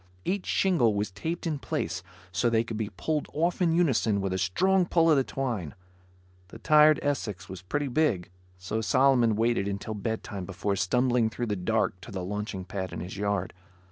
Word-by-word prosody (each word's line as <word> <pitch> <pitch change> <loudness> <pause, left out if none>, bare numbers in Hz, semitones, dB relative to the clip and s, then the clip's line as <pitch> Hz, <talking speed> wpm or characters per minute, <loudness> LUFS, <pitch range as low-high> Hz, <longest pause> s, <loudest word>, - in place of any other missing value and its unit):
Each 195 0 -1
shingle 150 - +2
was 105 0 -1
taped 160 - -4
in 155 -4 -1
place - - -3 0.3
so 120 - +1
they 115 -1 +2
could 115 -1 -6
be 105 -1 -2
pulled 155 -2 -1
off 170 +4 0
in 170 -2 +3
unison 130 -11 +2
with 95 -1 -1
a 95 - -1
strong 180 - +2
pull 165 -2 +3
on 155 - +6
the 135 - +3
twine. 120 - -3 0.7
The - - -11
tired 150 0 +5
Essex 105 -10 -2
was 95 -1 -8
pretty 145 +10 -2
big, 120 - 0 0.3
so 90 +5 -3
Solomon 120 -1 +3
waited 115 -2 +1
until 100 +2 -4
bedtime 105 -2 -4
before 100 +1 -2
stumbling 120 +4 +2
through 120 +2 -3
the 105 -3 -1
dark 95 -1 0
to - - -10
the 95 -2 -4
launching 105 0 -4
pad 95 -2 -4
in - - -5
his 90 +2 -6
yard. 100 -1 -1
110 Hz, 190 wpm, -28 LUFS, 100-145 Hz, 0.7 s, on